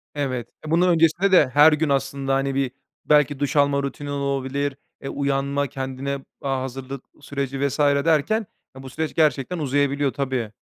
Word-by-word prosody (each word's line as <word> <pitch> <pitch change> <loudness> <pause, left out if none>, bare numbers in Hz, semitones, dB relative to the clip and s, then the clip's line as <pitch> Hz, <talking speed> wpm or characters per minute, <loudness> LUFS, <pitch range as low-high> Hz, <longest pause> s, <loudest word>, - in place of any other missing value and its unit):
Evet. 130 -5 -2 0.2
Eee, 155 - -5
bundan 180 +2 +4
öncesinde 170 +3 +3
de 150 -8 +6
her 150 +2 +7
gün 150 0 0
aslında, 135 0 0
hani, 135 0 -1
bir 135 -3 0 0.3
belki 150 -2 +3
duş 145 +1 -1
alma 140 -1 +3
rutinin 145 +1 -5
olabilir. 140 0 -2 0.2
Eee, 135 - -5
uyanma, 140 0 -1
kendine, 135 +1 -4 0.2
aaa, 135 -2 -1
hazırlık 135 +1 -6 0.2
süreci 140 -1 -4
vs. 140 +2 -5
derken, 150 +8 +2 0.3
eee, 130 - -10
bu 130 - -8
süreç 155 +3 -3
gerçekten 155 +1 +1
uzayabiliyor, 140 -1 0
tabii. 130 -6 -2
140 Hz, 165 wpm, -23 LUFS, 135-150 Hz, 0.3 s, her